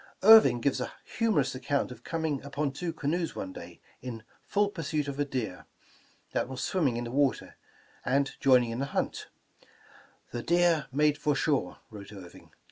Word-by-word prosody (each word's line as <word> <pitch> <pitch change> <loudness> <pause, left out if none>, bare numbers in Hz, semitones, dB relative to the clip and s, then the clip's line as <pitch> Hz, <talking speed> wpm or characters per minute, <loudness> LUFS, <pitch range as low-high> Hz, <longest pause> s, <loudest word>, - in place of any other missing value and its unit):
Irving 195 - +8
gives 130 0 0
a - - -4
humorous 185 - 0
account 135 +1 -1
of 125 - -11
coming 160 -5 -2
upon 140 0 -2
two 165 +5 -4
canoes 165 +2 -2
one 95 -1 -5
day, - - -11 0.2
in 115 -3 -7 0.2
full 205 0 +2
pursuit 155 -5 -2
of 140 0 -5
a 145 - +2
deer, 125 -9 -4 0.6
that - - -1
was 130 0 -5
swimming 145 -11 +1
in 120 - -3
the 120 - -6
water, 140 0 0 0.5
and 135 +1 +1
joining 125 -3 +4
in 115 - -4
the 140 +1 -4
hunt: - - -2 1.0
The 120 - -4
deer 170 -2 +2
made 150 +2 +2
for 150 - +1
our - - -3
shore," 135 - 0
wrote 105 -1 -10
Irving. 95 -4 -12
140 Hz, 175 wpm, -29 LUFS, 125-155 Hz, 1.0 s, Irving